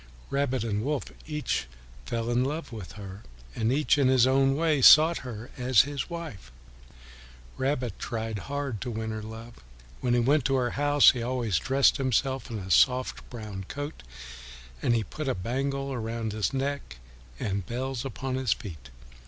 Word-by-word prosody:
Rabbit 140 -4 0
and 105 -2 -1
Wolf 145 0 -1 0.2
each 150 - -2 0.4
fell 115 0 -2
in 120 +1 +2
love 150 +3 -3
with 105 -8 -8
her, 100 -1 -9 0.3
and 115 +1 +1
each 145 +1 +2
in 135 - +4
his 130 -2 +5
own 135 +1 +3
way 155 -2 +2
sought 160 +6 +8
her 120 -2 -8
as 125 -2 +5
his 140 +4 -4
wife. 160 - -7 1.0
Rabbit 130 -5 -2
tried 110 -2 -3
hard 140 -6 -3
to 125 - -3
win 110 -1 -3
her 110 0 -4
love. 110 +2 -9 0.4
When 120 -1 +1
he - - +3
went 140 +4 +3
to 135 - +2
her 125 -2 +1
house 145 0 +5
he 125 - -5
always 120 -7 0
dressed 135 +2 +3
himself 130 -1 0
in 115 - -4
a 95 -2 -6
soft 125 - +3
brown 105 -5 -7
coat, 145 - -6 0.8
and 120 - +2
he 115 - +1
put 150 +9 -6
a 130 - 0
bangle 135 +7 -2
around 115 -2 -3
his 105 0 -1
neck 135 - -3 0.4
and 100 -1 -2
bells 130 +1 -3
upon 135 0 -4
his 130 -4 +2
feet. 80 - -10
125 Hz, 170 wpm, -28 LUFS, 110-140 Hz, 1.0 s, sought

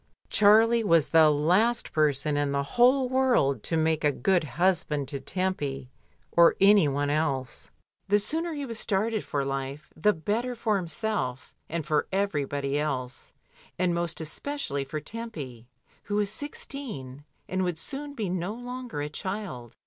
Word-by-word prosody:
Charlie 225 +3 +5
was 165 -6 +3
the 160 -1 +6
last 185 +11 +2
person 150 -1 +2
in 145 -1 0
the 140 0 0
whole 250 - +3
world 250 - +2
to 165 - -1
make 160 0 +1
a 150 - +4
good 185 +4 +1
husband 150 -1 +1
to 140 -2 -2
Tempy 140 -5 -3 0.4
or 170 0 +6
any 200 -4 +6
one 145 +1 0
else. 140 -4 -2 0.4
The 205 +1 +4
sooner 320 +11 -2
he 290 -3 -4
was 230 -3 -4
started 215 +1 0
for 140 -1 -2
life, 135 +1 -5
the 210 +7 +3
better 225 +9 -2
for 215 -3 0
him 175 - -5
self 150 - -2 0.2
and 165 -2 -3
for 150 -1 +1
everybody 145 -7 -1
else, 135 -4 -3 0.5
and 180 -1 +1
most 170 -1 -1
especially 160 - -3
for 135 +3 -5
Tempy, 150 - -7 0.4
who 205 - -2
was 205 -1 +2
sixteen, 220 - -6 0.2
and 185 0 -1
would 180 -3 -1
soon 285 - -7
be 215 -6 -2
no 180 +3 -2
longer 245 -7 -6
a 145 - -2
child. 175 - -6
170 Hz, 155 wpm, -27 LUFS, 145-215 Hz, 0.5 s, the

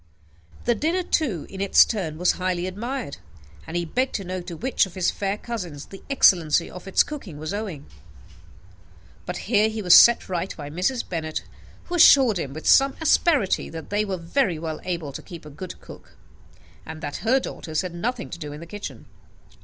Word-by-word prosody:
The 240 - +3
dinner, 330 - 0
too, 250 - -1
in 195 - -8
its 200 - +6
turn, 175 -9 -3
was 180 +2 +3
highly 180 -1 -2
admired; 230 - -5 0.5
and 170 - -3
he 175 - -1
begged 255 +10 -1
to 200 - -2
know 185 0 -4
to 175 -1 -8
which 250 -2 +1
of 175 - -15
his 185 -2 +1
fair 200 0 -2
cousins 180 -12 -6
the 195 - -12
excellence 175 - +5
of 180 +2 -10
its 195 - +4
cookery 275 - -8
was 155 +3 -5
owing. 195 -9 -5 1.4
But 180 - -3
here 215 0 +3
he 220 -1 -5
was 180 - +6
set 235 0 +7
right 185 0 -3
by 145 -2 -7
Mrs. 185 - -1
Bennet, 160 -3 -4 0.4
who 350 - -9
assured 270 - +6
him, 135 - -4
with 155 +3 -8
some 275 0 +5
asperity, 310 - +2
that 160 +1 -9
they 205 +1 +1
were 195 -3 -3
very 175 - 0
well 160 -1 -5
able 170 -5 -3
to - - -7
keep 170 -5 -11
a 150 - -10
good 175 +6 -8
cook, - - -14 0.7
and 160 0 -9
that 145 -2 -4
her 250 +4 +2
daughters 160 - -4
had 180 -2 -6
nothing 175 - -3
to - - -7
do 150 -3 -6
in 150 - -8
the 170 - -9
kitchen. 170 - -8
185 Hz, 195 wpm, -24 LUFS, 165-225 Hz, 1.4 s, set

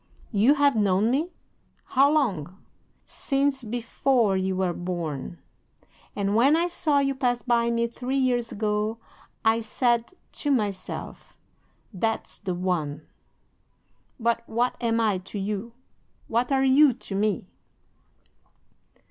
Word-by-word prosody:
"'"You 230 +7 +4
have 285 -2 +3
known 205 +1 +2
me? 305 +7 0 0.5
How 275 +2 +3
long?" 190 - 0 0.5
"'"Since 275 -1 -1
before 235 -1 +1
you 190 0 0
were 185 -2 0
born! 170 -3 -4 0.8
And 200 0 0
when 270 +7 +5
I 335 +1 +2
saw 335 -4 +1
you 275 -1 +2
pass 250 -3 -1
by 235 -1 +2
me, 235 0 +1
three 250 +3 -3
years 245 -3 +1
ago, 210 +1 -1 0.5
I 225 +1 +4
said 235 +4 0 0.2
to 295 - -4
myself, 205 -8 -3 0.6
THAT'S 225 +4 -2
THE 185 -2 -3
ONE." 160 -5 -2 1.2
"'"But 230 0 +1
what 240 +3 0
am 230 -1 +1
I 210 -4 +1
to 190 +3 -9
you? 205 +3 -3 0.5
What 240 +3 0
are 270 0 +3
you 270 +1 +6
to 215 - -9
me?" 200 -1 0
230 Hz, 125 wpm, -25 LUFS, 195-260 Hz, 1.2 s, you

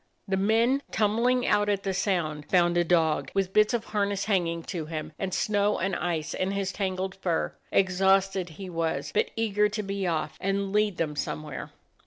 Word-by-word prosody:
The 195 - +1
men 225 +7 +2
tumbling 235 +4 +2
out 205 0 +2
at 200 -1 0
the 195 - -1
sound 165 -6 -1
found 175 -1 +3
a 175 - +4
dog, 165 -2 +2
with 195 -1 0
bits 215 0 +5
of 235 -2 -1
harness 200 -2 -1
hanging 170 -5 0
to 165 -4 -5
him, 155 -1 -5
and 190 -1 -2
snow 205 +1 +1
and 185 +1 -1
ice 160 -3 -2
in 185 - -1
his 195 -1 -1
tangled 190 -1 -2
fur. 180 -4 -1 0.2
Exhausted 190 -1 +2
he 195 - -6
was, 165 -5 -2
but - - +2
eager 210 -2 +2
to 210 0 -3
be 195 -1 -2
off 160 -2 -2
and 195 0 -1
lead 210 -3 +2
them 150 -2 -1
some 150 +1 -3
where. 150 -4 -7
190 Hz, 190 wpm, -27 LUFS, 170-205 Hz, 0.2 s, bits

